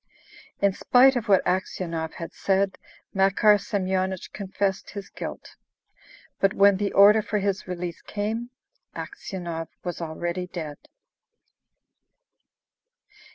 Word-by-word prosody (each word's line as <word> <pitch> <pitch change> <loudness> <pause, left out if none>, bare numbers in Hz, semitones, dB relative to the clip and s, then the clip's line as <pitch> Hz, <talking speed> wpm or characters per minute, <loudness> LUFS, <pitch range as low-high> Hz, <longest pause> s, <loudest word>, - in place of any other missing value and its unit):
In 200 -1 +4
spite 260 +6 +5
of 235 -2 -2
what 195 -2 +4
Aksionov 170 -3 -2
had 165 - -7
said, 195 0 0 0.3
Makar 200 +2 +4
Semyonich 190 -2 -2
confessed 195 -1 -2
his 200 -1 -8
guilt. - - -7 0.8
But 195 +1 +2
when 200 -1 +6
the 200 0 -1
order 210 +2 +7
for 210 0 -2
his 200 -1 -1
release 175 -1 -5
came, 220 +3 -3 0.5
Aksionov 170 -4 -5 0.2
was 175 -1 -4
already 170 +2 -3
dead. 155 -5 -6
195 Hz, 110 wpm, -25 LUFS, 180-205 Hz, 0.8 s, order